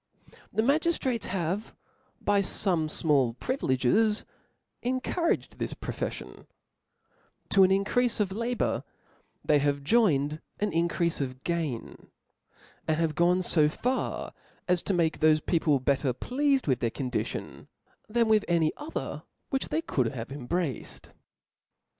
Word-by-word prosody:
The 220 - +1
itiagiftrates 275 -4 +1
have, 185 +3 -2 0.4
by 205 -1 +2
fome 180 -4 0
ftnall 140 -6 +1
privileges, 210 - +1 0.6
encouraged 260 +7 -1
this - - -3
profeflion, - - -6 1.0
to 195 - +5
an 185 - +7
in 195 +1 +2
creafe 245 +1 +1
of 200 -3 +1
labour, 235 +4 -1 0.6
they 150 -1 +4
have 140 0 0
joined 150 -6 +2 0.2
an 210 0 0
increafe 170 -2 0
o^ 130 0 -7
gain 160 -9 -3 0.4
\ - - -29
and 155 - +2
have 165 -2 +1
gone 175 +4 +3
fo 155 -4 +3
far 250 +11 -2 0.3
as 180 -1 +2
to 200 - -1
make 165 -2 +1
tho& 155 0 +5
peo 170 +2 +1
ple 150 -4 +2
better 135 0 +1
pleafed 275 - +1
with 130 -3 +2
their 115 - +1
condition, 125 +1 -4 0.4
than 230 +1 +2
with 215 -1 +4
any 165 -3 +2
other 300 +2 -5 0.3
which 270 -1 -1
they 160 +2 -1
could 130 -4 0
have 115 +1 -6
embraced.. 145 +1 -4
170 Hz, 135 wpm, -28 LUFS, 145-220 Hz, 1.0 s, an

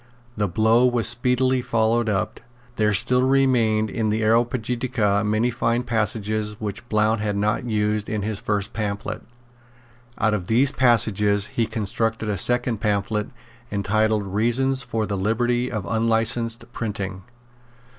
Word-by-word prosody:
The 105 -1 0
blow 110 +6 +3
was 120 -3 +1
speedily 125 +2 +2
followed 115 -1 +1
up. 110 +1 -2 0.4
There 105 -1 +2
still 125 +5 +3
remained 125 -5 +2
in 110 -2 -1
the 110 +1 0
Areopagitica 115 -2 +1
many 110 +3 +1
fine 120 +1 0
passages 110 -2 -2
which 110 +3 -6
Blount 110 0 +1
had 105 -1 -1
not 105 +4 0
used 105 -2 -1
in 105 -2 -2
his 105 -1 -3
first 100 -1 -2
pamphlet. 100 -2 -4 1.0
Out 110 -1 +1
of 90 -4 -3
these 130 +5 +3
passages 105 -5 +2
he 115 -2 +1
constructed 110 +1 -2
a 100 - -1
second 120 -1 +1
pamphlet 105 0 -1 0.4
entitled 105 +1 +1
Reasons 120 +7 +1
for 115 -3 -2
the 105 - -3
Liberty 120 +5 0
of 110 -4 -4
Unlicensed 115 +1 0
Printing. 100 -4 -4
110 Hz, 135 wpm, -23 LUFS, 105-120 Hz, 1.0 s, blow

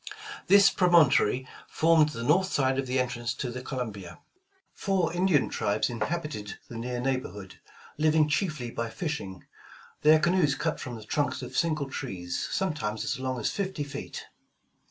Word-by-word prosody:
This 200 0 +7
prom 180 -2 +2
ontory 130 -6 +5 0.2
formed 160 -1 +4
the 115 -6 -6
north 185 +8 +3
side 135 -1 +1
of 135 - -2
the 130 +1 0
entrance 120 -2 -2
to 125 - -4
the 125 +1 -6
Columbia. 120 -8 -5 0.6
Four 185 -5 0
Indian 175 -5 +3
tribes 105 +4 0
inhabited 115 -3 -4
the 115 - -8
near 125 +1 -3
neighborhood, 125 -7 -3 0.4
living 155 0 +4
chiefly 150 -6 -1
by 115 0 -3
fishing, 110 - -5 0.6
their 155 +1 +7
canoes 160 -3 +2
cut - - -2
from 125 -2 -6
the 110 - -9
trunks 145 +6 -1
of - - -8
single 155 -4 +1
trees, 90 -8 -4
sometimes 150 - -2
as - - -2
long 130 -1 -2
as 110 - -1
fifty 190 -6 -3
feet. 140 0 -7
135 Hz, 155 wpm, -28 LUFS, 120-160 Hz, 0.6 s, This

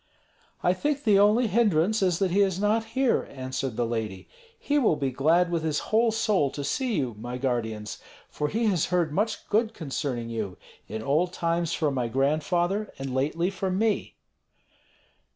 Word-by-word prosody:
"I 180 - +4
think 290 +8 -1
the 205 -4 +5
only 210 +4 +4
hindrance 210 -2 +2
is 180 -3 +2
that 190 -1 0
he 200 +3 +3
is 190 -2 +1
not 210 +2 +2
here," 265 -2 +2
answered 130 -2 -4
the 120 - +1
lady. 110 -5 -4 0.3
"He 290 0 +1
will 220 - +3
be 135 -3 -1
glad 165 +7 +2
with 170 -2 0
his 155 -2 -1 0.2
whole 230 +1 +4
soul 210 -9 +1
to 145 - -4
see 240 - -1
you, 125 -7 -1
my 120 +2 -5
guardians, 110 -5 -3 0.3
for 150 - -2
he 225 +9 -1
has 185 -7 +2
heard 175 -4 0
much 215 +5 -1
good 220 +1 +1
concerning 135 -6 -3
you, 105 -5 -4 0.3
in 110 +2 -5
old 165 +8 +1
times 170 -1 0
from 150 -3 0
my 125 -3 -1
grandfather, 170 - 0
and 135 -1 -5
lately 155 +7 0
from 190 -1 -2
me." 220 0 0
170 Hz, 175 wpm, -26 LUFS, 135-205 Hz, 0.3 s, the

